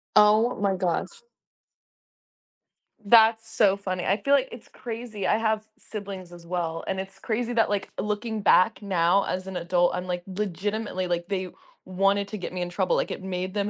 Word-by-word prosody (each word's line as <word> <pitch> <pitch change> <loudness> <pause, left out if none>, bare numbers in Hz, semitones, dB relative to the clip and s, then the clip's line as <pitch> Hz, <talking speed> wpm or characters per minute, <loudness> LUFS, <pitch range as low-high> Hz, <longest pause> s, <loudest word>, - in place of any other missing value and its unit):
Oh 215 +3 +5
my 200 -1 +1
gosh. 180 -2 -1 1.9
That's 225 +1 +5
so 200 -4 +3
funny, 185 -2 -3
I 195 - +2
feel 280 - +2
like 270 -2 +3
it's 240 - -11
crazy. 230 -4 -5
I 215 - +3
have 220 -1 0
siblings 195 -4 -8
as 175 -1 -12
well, 170 -2 -2
and 190 0 -1
it's 190 0 -7
crazy 240 +2 -2
that 225 -2 +3
like, 205 -2 -1
looking 210 +1 -2
back 200 +2 +4
now 190 0 +2
as 185 +1 -3
an 190 -1 -4
adult, 175 0 +2
I'm 180 +1 -4
like, 180 -1 -3
legitimately, 200 0 -3
like, 175 -1 -2
they 185 -2 -2 0.3
wanted 195 +2 +1
to 215 - -5
get 185 - -5
me 180 - -3
in 175 - -2
trouble, 185 0 0
like, - - 0
it - - -5
made 185 0 -3
them 205 0 -1
195 Hz, 185 wpm, -26 LUFS, 180-215 Hz, 1.9 s, Oh